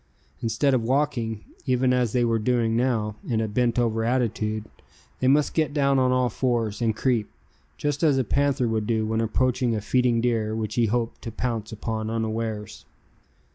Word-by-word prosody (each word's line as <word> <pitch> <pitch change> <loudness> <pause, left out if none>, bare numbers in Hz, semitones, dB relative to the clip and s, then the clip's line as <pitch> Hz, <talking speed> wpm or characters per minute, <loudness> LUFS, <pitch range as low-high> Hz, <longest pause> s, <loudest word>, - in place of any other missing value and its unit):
Instead 115 +5 +1
of 125 - +2
walking, 115 -3 -1 0.2
even 125 0 +2
as 125 -3 +1
they 120 0 +2
were 115 -1 +1
doing 115 0 +1
now, 115 -4 0
in 115 -3 +1
a 110 - 0
bent 120 +3 0
over 115 -2 +1
attitude, 110 -3 -1 0.5
they 130 - +1
must 145 +2 +3
get 155 -2 0
down 140 -2 +3
on 130 0 +3
all 125 0 +2
fours, 115 -3 -1
and 110 -2 +1
creep, 115 -2 0 0.5
just 145 0 -2
as 150 -5 +4
a 130 - +2
panther 140 +1 +1
would 110 -2 -1
do 110 -2 +1
when 110 +1 0
approaching 125 +1 +1
a - - -1
feeding 120 +2 +2
deer 115 -2 0
which 110 -1 -3
he 115 0 +2
hoped 115 +1 -2
to 115 - -6
pounce 115 -2 -3
upon 110 0 -3
unawares. 110 -1 -3
115 Hz, 180 wpm, -25 LUFS, 110-130 Hz, 0.5 s, as